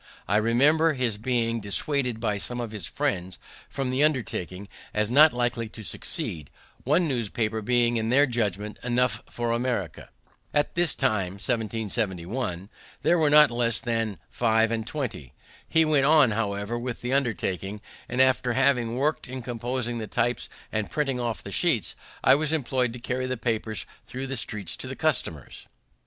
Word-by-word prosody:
I 105 - +3
remember 145 +9 +4
his 125 -6 -1
being 115 -1 0
dissuaded 125 +4 +1
by 105 -3 -1
some 120 +4 -4
of 120 -3 -4
his 105 -6 -5
friends 90 -1 -2 0.3
from 135 -2 -2
the 130 +3 +2
undertaking, 100 - -1 0.3
as 105 +1 +1
not 150 +4 +7
likely 120 -2 -1
to 110 0 -10
succeed, 75 -6 -3 0.3
one 155 +6 +2
newspaper 115 -4 -1
being, 120 +1 +2
in 110 0 -1
their 140 +4 +5
judgment, 105 -5 -2
enough 120 -3 +1
for 120 -1 -2
America. 115 -9 -2 0.5
At 145 - +2
this 170 -3 +1
time 105 -9 0
(1771) 105 -3 -2 0.3
there 175 -1 +3
are 150 - +4
not 150 -2 +7
less 120 -1 +1
than 115 -5 -2
five 115 - +2
and 115 -1 -2
twenty. 120 - -5 0.4
He 160 0 +4
went 145 -3 +3
on, 150 -6 +6
however, 105 +1 -2
with 120 -1 -5
the 125 +2 -2
undertaking, 105 -6 -1 0.3
and 125 - -3
after 130 -2 +3
having 125 -3 +2
worked 150 +4 0
in 130 0 -6
composing 120 0 -3
the 110 - -5
types 120 +3 -1 0.2
and 110 -1 -2
printing 135 -4 -1
off 120 -3 -3
the 100 - -7
sheets, 125 - +2 0.3
I 130 - +7
was 150 +2 +1
employed 130 -5 0
to 125 - -7
carry 130 +1 -2
the 130 0 -2
papers 110 -4 -2 0.2
thro' 130 +1 -5
the 135 0 -3
streets 105 -7 -3
to - - -6
the - - -5
customers. - - -2
120 Hz, 165 wpm, -26 LUFS, 110-130 Hz, 0.5 s, not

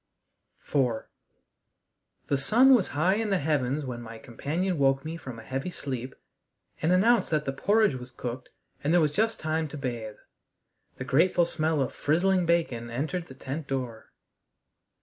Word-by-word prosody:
IV 125 -6 +1 1.2
The 140 - +1
sun 240 - +6
was 225 -7 +4
high 175 +5 +3
in 220 -1 -1
the 195 - +2
heavens 145 -2 0
when 120 -2 -5
my 115 -1 -9
companion 155 +9 -2
woke 135 +1 +2
me 160 +1 -4
from 130 -7 -8
a 110 - -10
heavy 135 +8 -3
sleep 130 -6 -5 0.7
and 160 - +2
announced 225 +6 +4
that 155 -2 0
the 135 - -2
porridge 205 +5 +3
was 125 -1 -7
cooked 125 0 -6 0.3
and 145 - +1
there 175 - +5
was 155 -3 +2
just 220 +7 0
time 155 0 -1
to 150 - -8
bathe. 120 -6 -4 0.8
The - - -4
grateful 170 +6 +3
smell 155 -3 0
of 125 - -5
frizzling 180 +4 +2
bacon 130 -9 0
entered 160 +8 -3
the 130 - -12
tent 140 +3 -6
door. 125 -5 -4
145 Hz, 165 wpm, -27 LUFS, 130-175 Hz, 1.2 s, sun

